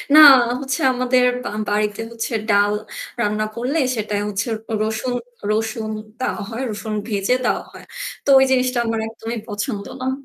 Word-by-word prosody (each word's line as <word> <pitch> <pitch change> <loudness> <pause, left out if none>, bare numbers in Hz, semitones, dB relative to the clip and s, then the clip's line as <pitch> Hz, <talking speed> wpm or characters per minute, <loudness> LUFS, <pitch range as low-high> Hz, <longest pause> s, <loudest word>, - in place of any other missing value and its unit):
না - - +10 0.4
হচ্ছে 270 -1 -2
আমাদের 250 0 +2 0.3
আ - - -7 0.2
বাড়িতে 210 +1 0
হচ্ছে 230 +1 -4 0.2
ডাল 205 0 +4 0.5
রান্না 210 0 0
করলে 250 +6 -1 0.2
সেটাই 210 -2 -2
হচ্ছে 205 +3 -2 0.3
রসুন 220 +3 -1 0.4
রসুন 220 0 -1 0.3
দেওয়া 240 - -2
হয়। 230 +2 -5
রসুন 215 +1 -5
ভেজে 205 +2 +1
দেওয়া - - +1
হয়। - - -12 0.4
তো - - -1
ওই 265 - +5
জিনিসটা 255 -1 +2
আমার 225 0 0
একদমই 225 +1 -5
পছন্দ 205 0 -3 0.2
না। 260 +1 0
225 Hz, 150 wpm, -21 LUFS, 210-250 Hz, 0.5 s, না